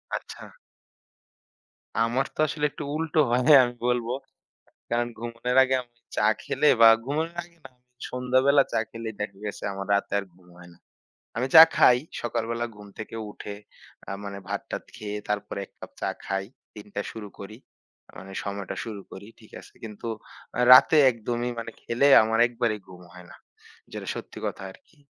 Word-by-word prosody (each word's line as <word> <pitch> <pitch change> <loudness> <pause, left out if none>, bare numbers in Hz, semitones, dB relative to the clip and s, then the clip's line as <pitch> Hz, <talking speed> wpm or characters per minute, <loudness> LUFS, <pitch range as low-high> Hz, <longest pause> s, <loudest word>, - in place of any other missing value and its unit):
আচ্ছা। - - -8 1.6
আমার 120 +4 0
তো - - -21
আসলে 150 0 -2
একটু - - -7
উল্টো 160 0 -1
হয় 120 +1 +2 0.2
আমি 120 0 -2
বলব। 125 -1 0 0.8
কারণ, 120 0 +1
ঘুমানোর 120 +2 -3
আগে 130 0 +1
আমি 120 -1 -15 0.2
চা 105 - +3 0.2
খেলে 150 +3 +1
বা 115 - +10 0.2
ঘুমানোর 155 +5 -2
আগে 170 0 -19
না, - - -9
আমি 125 0 -45 0.2
সন্ধ্যাবেলা 130 +3 +3
চা - - +2
খেলেই 115 -1 -6
দেখা 105 -1 -4
গেছে 105 - -6
আমার 100 0 -6
রাতে 100 - -1
আর 100 - -3
ঘুম 90 0 -23
হয় 90 0 -14
না। 85 - -21 0.6
আমি 125 +3 0
চা 160 - +13
খাই। 125 - +6 0.2
সকালবেলা 115 0 -2
ঘুম 105 0 -12
থেকে 110 +1 -7 0.2
উঠে 105 0 -8 0.5
আ - - -4
মানে 100 -1 -6
ভাত-টাত 100 0 -5
খেয়ে 105 -1 -5
তারপরে 105 -1 -3
১ - - -34
কাপ - - -10
চা - - 0 0.2
খাই। 95 0 -2 0.3
দিনটা 105 -1 -6
শুরু 110 -2 -8
করি। 105 +2 -9 0.6
মানে 95 +1 -10
সময়টা 100 -1 -5
শুরু 105 -3 -7
করি। 100 +2 -10
ঠিক - - -18
আছে? - - -17
কিন্তু 110 +1 -7 0.5
আ - - -1
রাতে 140 +5 +7
একদমই 120 +1 -3
মানে 115 0 -6
খেলে 120 +4 +2 0.2
আমার 110 +1 0
একবারেই 115 -2 -2
ঘুম 90 -1 -13
হয় 90 0 -13
না। - - -13 0.6
যেটা - - -7
সত্যি - - -8
কথা - - -4
আরকি। 155 - -22
115 Hz, 170 wpm, -26 LUFS, 100-125 Hz, 1.6 s, চা